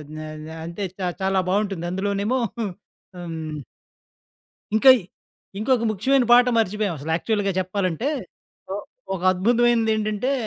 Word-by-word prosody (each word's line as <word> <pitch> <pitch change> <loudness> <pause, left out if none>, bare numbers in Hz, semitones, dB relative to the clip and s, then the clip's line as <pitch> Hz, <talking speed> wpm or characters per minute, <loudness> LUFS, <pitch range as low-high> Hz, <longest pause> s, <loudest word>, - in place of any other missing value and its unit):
న - - -7 0.3
న - - -9 0.2
అంతే. 170 +4 -5 0.2
చా 185 - -1
చాలా 190 0 +2
బావుంటుందందులోనేమో 200 +4 0 0.2
హుహు. 220 - 0 0.5
హ్మ్ 160 -3 -5 1.2
ఇంకా 260 +5 +7
ఇ - - -9 0.6
ఇంకొక 235 +1 +2
ముఖ్యమైన 255 +6 +2
పాట 245 +1 +7
మర్చిపోయాం 210 -4 0
అసలు 150 +3 -5
యాక్చువల్‌‌గా 205 +1 0
చెప్పాలంటే, 185 - -1 0.6
ఓహ్ 205 - -4 0.3
ఒక 180 - -4
అద్భుతమైనదేంటంటే 225 +2 +2
205 Hz, 115 wpm, -23 LUFS, 185-225 Hz, 1.2 s, ఇంకా